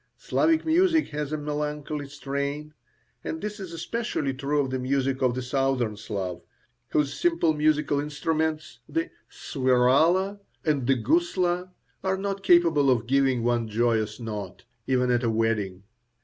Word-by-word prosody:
Slavic 320 0 +1
music 325 0 +3
has 150 -1 -4
a 155 - -1
melancholy 150 0 -3
strain, 140 +1 -4 0.5
and 160 - -4
this 210 +2 -5
is 190 -3 -7
especially 165 - -2
true 140 +3 -1
of 135 -2 -3
the 130 - -1
music 135 +1 0
of 125 -2 +2
the 130 - -3
Southern 130 -4 0
Slav, 100 -4 -4 0.5
whose 150 -2 +1
simple 335 - +2
musical 150 -1 +2
instruments, 155 +1 -2
the 330 +2 -2 0.2
"swirala" 145 +9 +2 0.3
and 145 -6 +1
the 135 - +4
"gusla," 175 - +1 0.3
are 190 0 0
not 195 0 -3
capable 170 -6 +4
of 120 -3 +2
giving 130 -1 +2
one 120 -1 +1
joyous 110 -1 0
note, 105 -5 -6 0.2
even 125 -1 +2
at 120 -1 +2
a 120 - +1
wedding. 110 -4 -1
140 Hz, 145 wpm, -26 LUFS, 125-165 Hz, 0.5 s, the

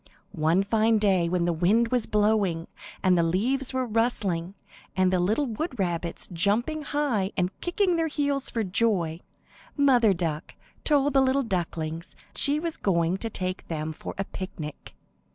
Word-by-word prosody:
One 160 +5 +2
fine 220 +2 +2
day 190 -5 +2
when 175 -1 +1
the 175 - +1
wind 205 +8 +2
was 245 -2 +1
blowing, 205 -6 +1 0.4
and 185 -2 +4
the 170 - +3
leaves 235 +11 0
were 260 -1 -1
rustling, 205 -6 0 0.4
and 185 0 +3
the 185 - +3
little 215 +11 +1
wood 255 +4 -4
rabbits 175 -3 -2
jumping 220 - 0
high 275 -10 -1
and 180 0 +1
kicking 360 0 +1
their 325 -1 +1
heels 285 -3 -1
for 230 -2 -1
joy, 185 -5 0 0.6
Mother 245 -8 +4
Duck 165 -3 -3 0.3
told 290 -2 +2
the 270 - +5
little 265 +1 +2
ducklings 165 -5 -3 0.2
she 290 +2 +3
was 330 0 -4
going 170 -1 +1
to 225 +3 -4
take 185 -2 -4
them 155 -1 -3
for - - -8
a 195 - 0
picnic. 160 -7 -8
200 Hz, 160 wpm, -26 LUFS, 175-255 Hz, 0.6 s, the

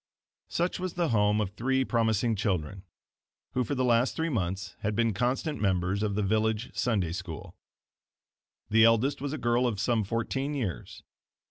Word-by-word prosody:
Such 175 +2 -1
was 185 -1 -4
the 175 -2 +1
home 105 -2 +3
of 100 -3 -1
three 130 +5 0
promising 115 -1 +1
children, 95 -3 -2 0.7
who 125 - 0
for 145 - -2
the 130 -1 +1
last 120 +1 +3
three 165 +1 -1
months 95 - -2
had 105 0 -2
been 115 0 +2
constant 125 - -1
members 95 0 +1
of 105 -2 0
the 105 - 0
village 110 +3 0
Sunday 100 -9 0
School. 85 -3 -7 1.2
The 110 +1 +6
eldest 120 +5 +3
was 145 -1 -2
a 155 - -3
girl 120 -1 +2
of 110 -5 -2
some 110 0 +1
fourteen 135 +7 -2
years. 110 - -4
110 Hz, 165 wpm, -28 LUFS, 100-130 Hz, 1.2 s, The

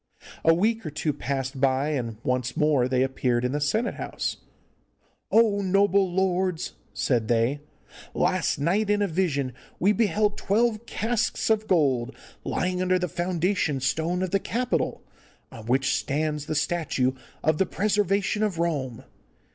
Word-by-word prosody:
A 165 - +6
week 220 +7 +1
or 155 - -4
two 150 0 -2
passed 135 -1 -3
by, 135 +2 +2
and 120 -7 -3
once 125 -1 -1
more 150 -5 +3
they 130 0 +2
appeared 125 -2 0
in 125 - 0
the 145 +1 -2
senate 220 +11 0
house. - - -4 0.9
'O, 215 -3 +4
noble 195 0 +3
lords!' 185 -2 0 0.2
said 120 -5 0
they, 120 +5 +1 0.6
'last 185 -1 +1
night 190 +9 +1
in 205 0 +2
a - - +1
vision 155 -7 -1 0.3
we 195 +4 +4
beheld 210 -1 +1
twelve 225 +2 +1
casks 225 0 0
of 215 0 +1
gold 135 -7 +1 0.3
lying 180 0 -1
under 185 0 +2
the 180 0 -1
foundation 175 -3 0
stone 160 +7 0
of 185 - -3
the 195 - +2
Capitol, 245 +5 -1 0.5
on 110 -1 -10
which 130 +2 +2
stands 150 +1 -2
the 155 - -2
statue 150 -4 0 0.3
of 155 -1 +2
the 190 - +2
Preservation 205 0 +1
of 210 -5 0
Rome. 145 -8 -2
170 Hz, 150 wpm, -26 LUFS, 135-200 Hz, 0.9 s, A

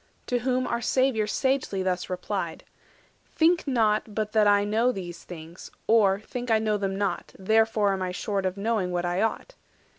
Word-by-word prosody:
To 245 - 0
whom 255 +1 0
our 235 - -2
Saviour 245 -3 +1
sagely 260 -6 0
thus 180 -1 -2
replied:— 180 -1 -4 0.6
"Think 335 0 +2
not 220 -4 +1
but 215 -1 -1
that 215 -1 +4
I 205 0 +4
know 225 +4 +2
these 175 -6 -7
things; 165 0 -10 0.2
or, 200 -3 +4
think 245 +3 -6
I 225 - +5
know 215 -1 0
them 195 -1 -2
not, 200 0 -3
not 190 - -13
therefore 220 -2 +3
am 190 - -3
I 185 -1 -2
short 195 +1 -2
Of 185 +1 -4
knowing 210 -2 0
what 175 0 -1
I 175 +2 0
ought. 225 - -2
210 Hz, 185 wpm, -26 LUFS, 190-230 Hz, 0.6 s, I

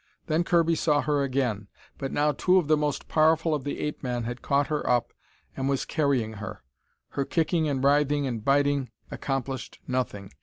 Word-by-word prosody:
Then 160 +1 +1
Kirby 170 -1 +3
saw 150 -2 +2
her 145 -1 +1
again. 125 -7 -1 0.3
But 135 - -3
now 150 +1 +2
two 180 +6 +3
of 175 -5 +2
the 155 - +5
most 150 -2 -2
powerful 160 +1 +3
of 145 -3 -1
the 145 - -4
ape 150 - -3
men 125 -3 -2
had 120 +2 -5
caught 140 +1 +2
her 150 0 -2
up 120 -1 +1 0.4
and 135 0 -1
was 135 -1 0
carrying 135 -7 0
her. - - -7 0.5
Her 140 - -1
kicking 160 +2 +1
and 135 -2 -1
writhing 145 0 +3
and 120 -5 -3
biting 140 0 +2 0.2
accomplished 135 -1 -4
nothing. 120 -7 -3
140 Hz, 185 wpm, -27 LUFS, 130-150 Hz, 0.5 s, the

